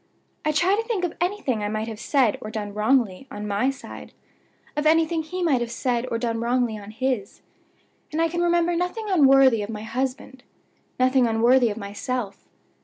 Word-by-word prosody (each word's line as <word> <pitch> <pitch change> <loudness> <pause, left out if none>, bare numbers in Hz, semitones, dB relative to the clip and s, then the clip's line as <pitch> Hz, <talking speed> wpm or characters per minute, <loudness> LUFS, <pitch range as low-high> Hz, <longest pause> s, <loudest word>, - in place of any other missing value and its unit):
I 305 - +1
try 350 +6 +3
to 435 - 0
think 450 -5 -3
of 350 - -2
anything 350 - -1
I 205 - -1
might 215 +1 -3
have 220 -2 -7
said 250 -4 +1
or 215 - -6
done 210 -2 -5
wrongly, 220 +1 +1
on 210 0 -6
my 210 +6 +1
side 275 0 -9 0.6
of 300 +1 +1
anything 325 +1 +3
he 360 +3 -4
might 280 -8 +2
have 240 - -2
said 240 +1 -1
or 230 - -1
done 230 -1 -2
wrongly, 240 -1 0
on 205 -1 -9
his; 225 -2 -3 0.7
and 310 - -2
I 330 - +3
can 345 +1 -2
remember 345 0 +2
nothing 360 +6 -2
unworthy 270 - +5
of 205 - -5
my 215 -1 -6
husband, 255 +2 -4 0.6
nothing 255 -1 +4
unworthy 235 +2 +4
of 205 - -5
myself. 205 +1 -5
255 Hz, 185 wpm, -24 LUFS, 220-315 Hz, 0.7 s, unworthy